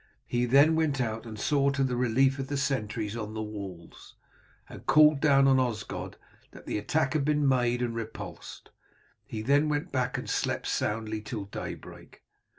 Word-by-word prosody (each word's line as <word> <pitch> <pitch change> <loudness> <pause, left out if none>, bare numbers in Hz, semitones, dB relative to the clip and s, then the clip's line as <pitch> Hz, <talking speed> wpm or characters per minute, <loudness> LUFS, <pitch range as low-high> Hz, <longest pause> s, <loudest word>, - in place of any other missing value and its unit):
He 120 0 0
then 140 +6 +5
went 155 -4 +1
out 115 -1 -2
and 110 -1 -8
saw 140 +1 +2
to 140 0 0
the 130 -2 0
relief 130 +3 +2
of 135 - -3
the 145 - -2
sentries 110 -6 -2
on 110 -1 -5
the 110 - -3
walls, 100 -5 -9 0.5
and - - -12
called 150 -1 +6
down 140 -2 +4
to 135 - +5
Osgod 115 -4 -4 0.3
that - - -14
the - - -2
attack 155 +10 0
had 155 -3 +1
been 150 0 +2
made 125 -2 +2
and 120 -1 -2
repulsed. 115 -1 -8 0.6
He 110 -1 -5
then 145 +4 +3
went 145 0 -2
back 130 0 -1
and 125 - -6
slept - - -1
soundly 110 0 -2
till 105 -1 -5
daybreak. 100 - -9
125 Hz, 175 wpm, -28 LUFS, 110-140 Hz, 0.6 s, called